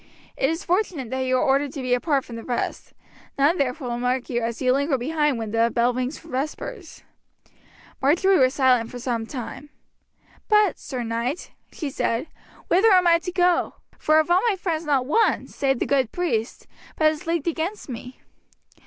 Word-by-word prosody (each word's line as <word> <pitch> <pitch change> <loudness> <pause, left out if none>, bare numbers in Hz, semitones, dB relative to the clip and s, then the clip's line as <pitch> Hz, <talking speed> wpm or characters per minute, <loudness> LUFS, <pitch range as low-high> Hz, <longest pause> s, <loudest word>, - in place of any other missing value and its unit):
It 270 - +1
is 325 +3 -3
fortunate 350 - -1
that 260 0 -1
you 255 0 +2
are - - +1
ordered 280 -1 +2
to 280 - -5
be 250 -1 +1
apart 275 +2 +1
from 235 - -9
the 230 - -7
rest; 245 -2 -3 0.4
none 290 +6 +3
therefore 265 -1 -1
will 240 0 -3
mark 250 +1 -1
you 240 -1 0
as 230 0 -3
you 255 -1 +3
linger 280 +1 +1
behind 295 +1 0
when 220 -2 -4
the 230 +1 +2
bell 240 +1 +2
rings 255 +3 -3
for 330 - -15
vespers." 315 - -5 1.0
Marjory 355 +7 +4
was 260 0 +3
silent 250 -4 +3
for 250 - -8
some 240 -3 -3
time. 270 +3 -7 0.8
"But, 420 -5 +4
Sir 250 -2 -5
Knight," 235 +6 -3 0.2
she 295 -4 -5
said, 230 0 -1 0.4
"whither 410 +5 +4
am 365 -2 +5
I 335 -1 +5
to 360 - -5
go? 360 -1 +2 0.2
for 310 0 +3
of 315 +2 +2
all 360 +2 +5
my 410 - +1
friends 335 -3 -3
not 275 -4 +1
one, 445 - +2
save 270 -2 -1
the - - -1
good 265 -5 +1
priest, 240 -11 -2 0.3
but 310 -1 +4
is 310 +2 -8
leagued 335 -1 -1
against 335 +5 -3
me." 250 0 -8
275 Hz, 190 wpm, -24 LUFS, 250-335 Hz, 1.0 s, am